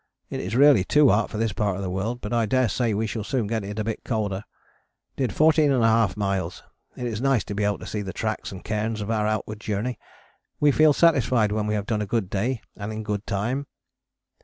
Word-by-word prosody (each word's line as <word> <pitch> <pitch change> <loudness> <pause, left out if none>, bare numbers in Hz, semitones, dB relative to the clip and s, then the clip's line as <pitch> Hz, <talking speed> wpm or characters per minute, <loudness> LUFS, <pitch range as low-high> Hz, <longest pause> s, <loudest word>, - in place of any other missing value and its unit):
It - - -3
is 110 - -3
really 140 -6 +6
too 150 +7 +4
hot 105 +1 +2
for - - -5
this 110 -2 0
part 100 -1 0
of 100 - -4
the 95 - -3
world, 110 +6 -3
but 105 - -4
I 115 -2 +2
daresay 120 -1 +1
we 110 +2 0
shall 110 0 -3
soon 125 0 -1
get 110 0 -2
it 105 +2 -6
a 110 - 0
bit 110 0 -4
colder. 105 -4 -2 0.7
Did 130 -3 0
14½ 125 - +3
miles, 95 -4 -2 0.3
it 125 - -5
is 115 -2 -3
nice 135 -4 +2
to - - -6
be 105 +1 -1
able 100 0 +1
to - - -10
see 105 - -3
the 95 -2 -5
tracks 110 +2 -3
and 95 -2 -9
cairns 110 0 -2
of 105 +2 -3
our 105 -1 +1
outward 110 0 -2
journey. 110 +3 -3 0.6
We 145 -1 +5
feel 155 +2 +5
satisfied 130 -9 +3
when 105 0 -1
we 105 - 0
have 105 -1 -2
done 105 -1 -1
a 105 - -3
good 105 -3 -1
day 115 +4 -1
and 100 +1 -5
in 110 0 -5
good 105 -1 -3
time. 120 +8 -2
110 Hz, 230 wpm, -24 LUFS, 105-120 Hz, 0.7 s, really